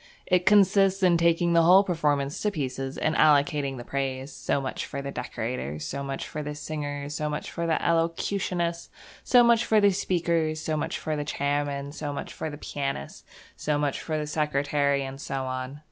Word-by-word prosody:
It 180 -1 +2
consists 195 -1 +4
in 180 -2 +5
taking 170 0 +2
the 170 - +6
whole 180 +4 +7
performance 150 -6 0
to 210 - +2
pieces 135 -6 -4
and 155 - 0
allocating 145 -2 +3
the 120 - -7
praise. 135 +1 -3
So - - -1
much 135 -1 -4
for 140 - -5
the 140 0 -5
decorators; 80 - -4
so 140 - -4
much 135 -1 -4
for 150 - -5
the 150 0 -5
singers; 145 -1 -5
so 150 -1 -2
much 150 0 -4
for 170 0 -3
the 160 - +1
elocutionists; 170 +1 -1 0.3
so 245 -1 +6
much 235 -1 +4
for 220 -2 +3
the 205 -1 +5
speakers; 170 -4 0
so 155 0 -2
much 150 - -2
for 155 -1 -3
the 150 - -2
chairman; 145 -1 -2
so 150 -1 -5
much 140 - -6
for 160 - -4
the 145 - -8
pianist; 135 - -5 0.3
so 150 -1 -1
much 145 -2 -1
for 155 -1 -2
the 150 - -2
secretary; 145 -2 0
and 135 +1 -7
so 135 -1 -3
on. 130 +2 -5
150 Hz, 190 wpm, -26 LUFS, 140-170 Hz, 0.3 s, whole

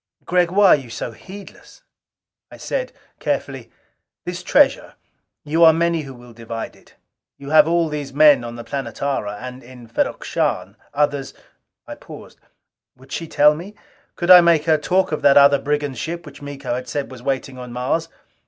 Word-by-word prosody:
Gregg, 180 -1 +2
why 200 +2 +4
are - - +8
you 135 -5 -8
so 115 - -5
heedless?" 195 - -14 0.7
I - - -13
said - - -4 0.3
carefully, - - -3 0.6
"This 180 0 -5
treasure 275 +9 +2 0.5
you 160 +3 +1
are 160 -1 +8
many 170 0 0
who 135 -3 -10
will 120 -1 -15
divide 115 0 -7
it. - - -23 0.4
You 140 +1 -9
have 155 -1 +6
all 170 0 +1
these 150 -3 -5
men 145 -3 +5
on 120 0 -7
the 120 - -8
Planetara. 115 -3 -4
And 125 +1 -8
in 125 -1 -14
Ferrok 115 - -2
Shahn, - - -2 0.2
others 145 -2 -1 0.3
" - - -56
I - - -7
paused. - - -13 0.6
Would 130 +1 -19
she 165 - -4
tell 150 0 +4
me? 180 +7 -9 0.4
Could 175 +1 +1
I 180 -1 +11
make 170 -3 +3
her 160 -2 +3
talk 185 +5 0
of 155 - -2
that 140 -1 +5
other 140 0 +6
brigand 145 -3 -2
ship 170 +1 -5
which - - -13
Miko 140 -3 -5
had 125 +1 -5
said 145 -2 -4
was 130 -2 -11
waiting 135 0 -3
on 125 -1 -9
Mars? 130 +7 -2
145 Hz, 180 wpm, -20 LUFS, 130-165 Hz, 0.7 s, I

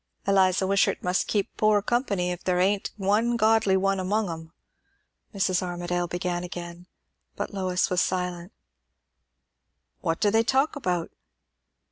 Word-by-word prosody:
"Eliza 190 -1 +3
Wishart 195 +1 +1
must 180 0 0
keep 205 -2 -1
poor 215 -1 +4
company, 200 -7 0
if 180 0 -6
there 180 -1 +1
ain't 195 +2 +1
one 215 +4 +1
godly 220 -3 +3
one 195 0 +1
among 200 +1 0
'em," 160 0 -8 0.8
Mrs. 190 -3 0
Armadale 175 -1 -2
began 175 0 -3
again. 175 0 -8 0.5
But - - -4
Lois 185 -2 0
was 180 - +2
silent. 180 0 -2 1.5
"What 165 -2 -1
do 205 - +2
they 225 +1 +4
talk 265 +6 +1
about?" 180 - -2
185 Hz, 135 wpm, -26 LUFS, 180-205 Hz, 1.5 s, poor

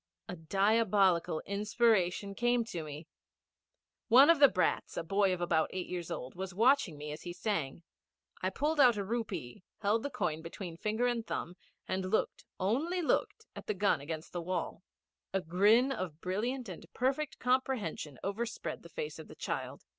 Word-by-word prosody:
A 180 - -5
diabolical 195 -1 +2
inspiration 200 -2 +1
came 240 +2 +1
to 175 -7 -5
me. 155 +1 -8 1.0
One 265 +7 +8
of 335 - +2
the 285 - +9
brats, 185 - 0
a - - -1
boy 195 +3 +2
about 175 -3 +1
eight 185 -1 -3
years 175 -2 -5
old, 125 - -5
was 190 0 -6
watching 230 - +3
me 150 +1 -6
as 150 - -7
he 175 - -6
sang. 170 -6 -2 0.6
I 185 - +1
pulled 295 +10 -1
out 245 -5 +6
a 200 - -1
rupee, 195 - -4 0.2
held 215 +2 +1
the 285 - -3
coin 175 - -2
between 170 +1 -7
finger 215 +7 -1
and 240 -2 0
thumb, 175 - -4 0.3
and 185 0 -2
looked 215 - 0 0.2
only 295 - 0
looked 445 +7 0
at - - -9
the 210 - -1
gun 190 -6 +2
against 155 +2 -6
the 175 - -2
wall. 175 0 -3 0.5
A 195 - +2
grin 205 +9 +4
of 180 - -4
brilliant 235 +8 -2
and 180 -4 -8
perfect 270 +4 0
comprehension 250 - -1
overspread 220 +4 -3
the - - -13
face 475 -2 -5
of - - -9
the - - -12
child. - - -4
200 Hz, 170 wpm, -32 LUFS, 175-240 Hz, 1.0 s, the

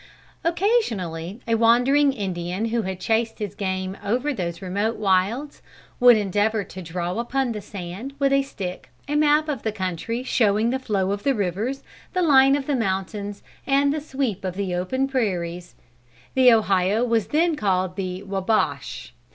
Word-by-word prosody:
Occasionally 230 - 0
a 230 - +1
wandering 245 +6 +4
Indian 185 -3 -3
who 235 +1 0
had 190 -2 -4
chased 225 +1 0
his 210 -3 -4
game 190 -1 -3
over 250 +8 0
those 170 -7 -4
remote 200 +4 -1
wilds, 210 +8 0 0.4
would 245 -2 +8
endeavor 205 +1 +1
to 190 - -9
draw 175 +3 -3
upon 255 +1 -1
the 210 -2 -4
sand, 200 +7 -7
with 275 -1 +2
a 275 - +4
stick, 190 -9 -6 0.2
a 295 - -2
map 300 +1 +3
of 280 -7 -2
the 220 - -1
country 205 +4 -3
showing 220 -2 +2
the 265 - -1
flow 200 -6 -1
of 200 0 -2
the 275 +2 +1
rivers, 210 +7 -2 0.3
the 365 -1 +1
line 275 -3 +6
of 285 -1 -2
the 285 - 0
mountains, 200 -1 -3 0.2
and 280 +1 +3
the 305 - -3
sweep 265 - -3
of 185 -1 -3
the 195 -2 -2
open 260 +10 -1
prairies. 180 -9 -2 0.6
The 255 -1 +6
Ohio 205 -1 +3
was 230 -4 +1
then 330 +2 +2
called 185 -6 0
the 185 0 -4
Wabash. 195 +2 -1
215 Hz, 165 wpm, -23 LUFS, 190-265 Hz, 0.6 s, would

